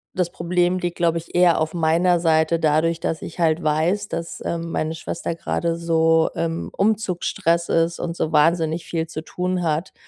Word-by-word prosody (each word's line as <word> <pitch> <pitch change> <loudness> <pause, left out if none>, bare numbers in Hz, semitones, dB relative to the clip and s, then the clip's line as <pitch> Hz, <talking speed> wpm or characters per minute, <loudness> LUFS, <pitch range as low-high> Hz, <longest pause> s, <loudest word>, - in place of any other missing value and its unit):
das 180 -2 0
Problem 175 +1 0
liegt, 175 -1 -3
glaube 170 -1 +1
ich 165 - -13
eher 175 -2 +4
auf 160 0 -1
meiner 170 +2 +2
Seite. 160 0 +2
Dadurch, 160 +1 +2
dass 160 -1 -3
ich - - -9
halt 165 0 +2
weiß, 165 +7 +1
dass, 165 0 -5
ähm, 165 0 -3
meine 160 0 -2
Schwester 170 0 -4
grade 165 0 -2
so 165 -1 +2
im 165 0 -3
Umzugsstress 180 -5 0
ist 165 +1 +1
und 170 -1 -3
so 155 - -1
wahnsinnig 165 +1 +2
viel 165 -1 -2
zu 155 -1 -6
tun 180 +2 -2
hat 160 +2 -1
165 Hz, 180 wpm, -22 LUFS, 160-175 Hz, -, eher